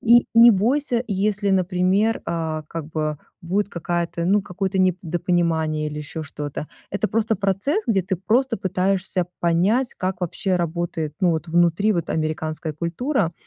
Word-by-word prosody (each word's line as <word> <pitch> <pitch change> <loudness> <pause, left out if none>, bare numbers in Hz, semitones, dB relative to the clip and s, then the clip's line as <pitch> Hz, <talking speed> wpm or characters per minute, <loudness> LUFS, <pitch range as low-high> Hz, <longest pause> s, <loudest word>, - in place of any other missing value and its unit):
и 240 +1 +5
не 235 +1 +9
бойся, 240 +4 +1
если, 200 +1 0
например, 190 +4 +2
а, 160 -2 -2
как 165 -3 -5
бы, 155 -2 -2 0.2
будет 195 +4 0
какая-то 170 -1 -2
ну, 200 +3 +3
какое-то 190 +1 -3
недопонимание 170 -3 0
или 150 0 -6
ещё 155 +2 -6
что-то. 145 0 -6 0.2
Это 205 +2 -1
просто 220 -1 +1
процесс, 200 - 0
где 205 -4 +3
ты 190 +1 -2
просто 230 +6 +1
пытаешься 185 -1 0
понять, 190 +10 +2
как 185 0 -3
вообще 180 +2 -1
работает, 165 -2 -2
ну, 180 -2 +4
вот 160 +1 -2
внутри 175 +5 +3
вот 170 -4 -2
американская 155 0 -2
культура. 170 - -1
180 Hz, 145 wpm, -22 LUFS, 165-205 Hz, 0.2 s, не